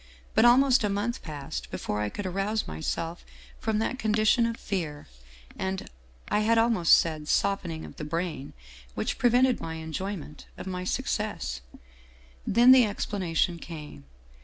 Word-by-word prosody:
But 220 - +5
almost 255 +1 +6
a 210 - +1
month 210 +5 -2
passed 135 - -6
before 105 +10 -3
I 105 - -1
could 205 - -6
arouse 195 +4 -1
myself 165 - -4 0.4
from 220 -1 -1
that 225 +4 -1
con 215 -3 +1
dition 220 +2 +3
of 230 - -5
fear 165 -7 -4 0.5
and 190 0 -4 0.4
I 210 - +1
had 225 +2 +3
almost 225 -7 +4
said, 155 -2 +3
softening 180 -5 0
of - - -12
the - - -6
brain 165 -2 -3 0.4
which - - -2
prevented 250 +1 +3
my 160 0 -5
enjoyment 160 0 -6
of - - -7
my 180 -1 -4
success. 200 - -2 0.4
" - - -27
Then 240 +4 +6
the 260 -1 +8
explanation 185 -4 -1
came. 150 - -9
190 Hz, 155 wpm, -27 LUFS, 155-220 Hz, 0.5 s, the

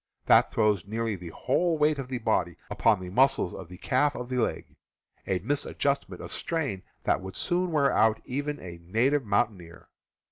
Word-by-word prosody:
That - - +6
throws 105 -4 +1
nearly 110 0 -2
the 90 -2 -8
whole 170 - 0
weight 150 -1 +2
of 135 - -4
the 130 -1 -3
body 110 -7 0
upon - - +3
the 90 -1 -7
muscles 130 -4 +3
of 95 - -8
the 90 - -10
calf 140 +7 +1
of 125 0 -6
the 130 - -2
leg, 115 - -2 0.5
a 95 - +1
mis 140 +11 -1
adjustment 140 0 -2
of - - -7
strain 145 - -2 0.2
that - - +1
would 95 -1 -8
soon 180 0 0
wear 145 -3 +3
out 110 0 +4
even 145 +3 -3
a 85 -2 -9
native 120 +11 +1
mountaineer. 100 -5 -2
115 Hz, 185 wpm, -28 LUFS, 95-140 Hz, 0.5 s, That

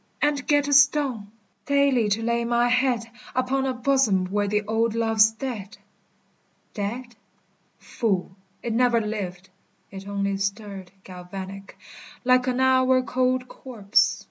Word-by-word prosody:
And 290 -2 0
get 290 -1 +2
a 285 - 0
stone! 275 -6 +3 0.4
Daily 280 -6 +2
to 215 +3 0
lay 235 0 0
my 240 +1 +1
head 250 -2 +1 0.3
Upon 265 +1 0
a 260 - -1
bosom 245 -7 +2
where 205 0 0
the 210 +1 0
old 225 +1 0
love's 225 -1 +4
dead! 220 -3 -7 1.0
Dead? 235 +4 -5 0.6
Fool! 190 -6 -2 0.3
It 235 - -2
never 240 0 +3
lived. 190 -4 -5 0.4
It 195 0 -9
only 200 -1 -2
stirred 200 -1 -4
Galvanic, 190 +2 -9 0.5
like 255 0 +3
an 255 0 0
hour 260 0 +3
cold 255 0 0
corpse. 220 -7 0
230 Hz, 130 wpm, -24 LUFS, 200-255 Hz, 1.0 s, love's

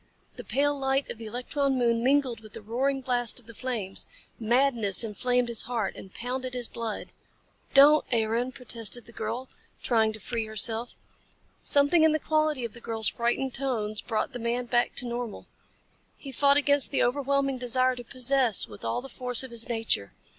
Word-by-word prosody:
The - - -8
pale 290 +1 +1
light 270 0 0
of 225 - -8
the 225 - -6
electron 265 +4 -1
moon 235 -2 +1
mingled 265 -3 +2
with 215 -1 -15
the 225 - -7
roaring 265 +5 -1
blast 245 -2 0
of 245 - -21
the 230 - -12
flames. 215 -5 -2 0.3
Madness 235 -3 +2
inflamed 245 +3 0
his 235 -2 0
heart 230 -5 -2
and 190 - -11
pounded 255 +3 -4
his 245 -2 0
blood. 230 -2 -6 0.6
"Don't, 295 +2 +8
Aaron," 230 +2 0
protested 235 -2 -3
the - - -13
girl, 230 +4 -4 0.4
trying 220 -3 +2
to 220 - -6
free 225 +1 -3
herself. 225 +2 -1 0.7
Something 285 +3 +4
in 315 -1 +5
the - - +3
quality 310 -4 0
of 225 - -7
the 235 - -10
girl's 225 -2 +1
frightened 240 +2 -1
tones 220 -6 -1
brought 220 -2 -2
the 245 - -4
man 240 +1 -1
back 240 0 +1
to 245 - -2
normal. 240 -2 -5 0.7
He 275 - -9
fought 280 +2 +4
against 285 -1 +3
the - - +1
overwhelming 275 +1 0
desire 255 +1 +2
to 245 - -8
possess 255 -2 +3
with 105 -2 -12
all 115 - -1
the - - -7
force 250 -2 -1
of 260 - -9
his 230 0 +1
nature. 225 - -1
245 Hz, 185 wpm, -27 LUFS, 225-270 Hz, 0.7 s, Don't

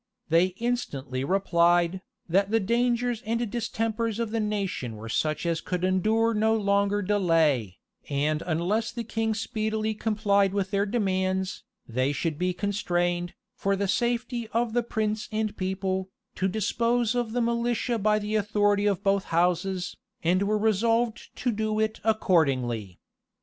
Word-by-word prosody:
They 165 +3 +5
instantly 140 - -2
replied, 175 0 +2 0.3
that 195 +3 +2
the 225 +1 +3
dangers 240 +2 +1
and 230 +1 -1
distempers 225 -1 -1
of 230 -2 -2
the 225 - 0
nation 200 - -2
were 110 +1 -8
such 155 +6 -1
as 165 -1 0
could 180 -1 -3
endure 215 +5 +2
no 220 +1 +2
longer 200 -1 +1
delay; 165 - +2 0.3
and 150 +2 0
unless 195 +8 0
the 235 0 -4
king 225 0 -1
speedily 220 -1 -1
complied 205 -3 +1
with 195 -1 -1
their 200 0 +1
demands, 190 -3 -1 0.2
they 130 +4 0
should 150 +2 -2
be 180 0 +1
constrained, 175 -3 -1 0.2
for 195 0 0
the 200 0 -1
safety 240 +2 -1
of 230 0 0
prince 215 -1 -1
and 215 -1 -1
people, 190 0 -2 0.2
to 190 - 0
dispose 230 +3 +1
of 240 -2 -1
the 245 - 0
militia 235 0 0
by 210 +1 +3
the 210 0 -3
authority 205 -1 +2
of 200 -3 0
both 195 -1 +2
houses, 180 +2 0 0.3
and 180 +3 +2
were 210 +2 +1
resolved 225 +2 +1
to 250 - 0
do 215 0 -1
it 220 0 0
accordingly. 130 - +1
205 Hz, 145 wpm, -27 LUFS, 180-225 Hz, 0.3 s, They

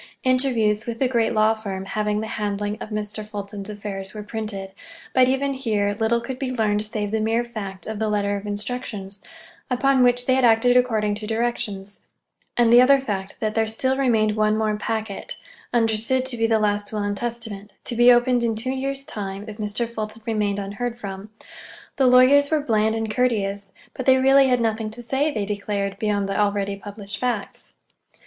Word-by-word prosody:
Interviews 245 -5 +2
with 230 -1 -3
the 260 - +2
great 235 -3 +1
law 215 0 +3
firm 195 -3 -5
having 210 +1 -1
the - - -3
handling 205 -1 -2
of - - -6
Mr. 215 0 -4
Fulton's 205 -1 -6
affairs 200 -1 -6
were 210 - -5
printed, 210 -3 -5 0.4
but 255 -1 +5
even 270 +2 +1
here 210 -6 0
little 225 +1 +2
could 250 +2 -6
be 270 -2 -2
learned 215 -4 0
save 210 -1 -3
the 220 - 0
mere 225 +2 +1
fact 200 -5 -7
of 220 -1 -5
the 220 -1 0
letter 205 -1 0
of 200 +1 -6
instructions, 205 -2 -5 0.5
upon 270 +1 +3
which 245 0 +3
they 260 - +3
had 260 0 +2
acted 240 +1 +5
according 220 -4 +2
to 210 +1 -6
directions, 220 -3 -2 0.5
and 235 -1 +4
the 240 - +9
other 275 +2 +6
fact 200 -7 -4
that 215 -1 0
there 225 0 +1
still 260 +4 +1
remained 225 -6 +2
one 215 0 +2
more 215 -1 +1
packet—understood 225 +3 -2
to 260 -2 -2
be 225 -1 +1
the 225 -1 +3
last 205 -1 0
will 210 -1 -2
and 205 0 -1
testament—to 225 -2 -5
be 240 +1 +7
opened 245 0 +3
in 230 -1 +1
two 245 +4 -2
years' 275 +1 -3
time 200 -1 -5
if 215 -1 -8
Mr. 215 +2 -2
Fulton 220 -1 -6
remained 210 -3 0
unheard 205 +4 -4
from. 200 -2 -7 0.7
The 265 -2 +4
lawyers 260 +3 +6
were 315 - +2
bland 220 -4 +1
and 225 0 -2
courteous, 205 -5 0 0.2
but 260 - -6
they 260 0 +7
really 270 +1 +5
had 250 -2 +2
nothing 220 -1 -1
to 225 +3 -6
say, 275 +5 0
they 210 -6 -2
declared, 200 -1 -3
beyond 205 -2 0
the 195 - -2
already 200 -1 0
published 200 0 -8
facts. 240 -5 -4
220 Hz, 190 wpm, -23 LUFS, 205-245 Hz, 0.7 s, the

